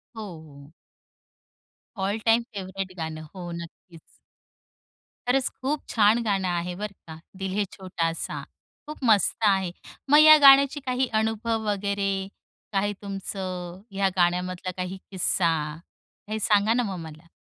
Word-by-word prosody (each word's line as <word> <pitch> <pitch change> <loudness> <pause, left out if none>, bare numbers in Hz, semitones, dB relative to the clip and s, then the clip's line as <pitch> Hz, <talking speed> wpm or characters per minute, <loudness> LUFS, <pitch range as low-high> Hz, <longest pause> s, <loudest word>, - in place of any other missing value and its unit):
हो, 220 - -6 0.2
हो. 145 -1 -15 1.3
All 200 +3 0
time 225 +1 +5
favourite 190 -1 -5
गाणं. 160 -1 -5
हो, 175 -3 -7
नक्कीच. 170 0 -10 1.3
खरंच 260 +1 +3
खूप 280 +3 -1
छान 220 +1 +4
गाणं 195 -3 0
आहे 175 0 -2
बरं 210 +1 -5
का 160 0 -9 0.2
दिल 190 -1 -3
है 210 - +3
छोटासा 165 -3 -3 0.5
खूप 305 - -7
मस्त 215 -5 +4
आहे. 190 -3 +2 0.4
मग 295 - +7
या 310 0 +10
गाण्याची 280 0 +7
काही 255 0 0
अनुभव 225 +1 -1
वगैरे, 200 -1 -1 0.5
काही 205 +1 +1
तुमचं 185 -2 -5
या 195 0 +1
गाण्यामधला 180 +1 0
काही 185 +1 -4
किस्सा, 180 -2 +2 0.8
हे 220 - -2
सांगा 210 +1 +3
ना 245 - +1
मग 195 -4 -4
मला. 155 +2 -15
195 Hz, 130 wpm, -25 LUFS, 180-220 Hz, 1.3 s, या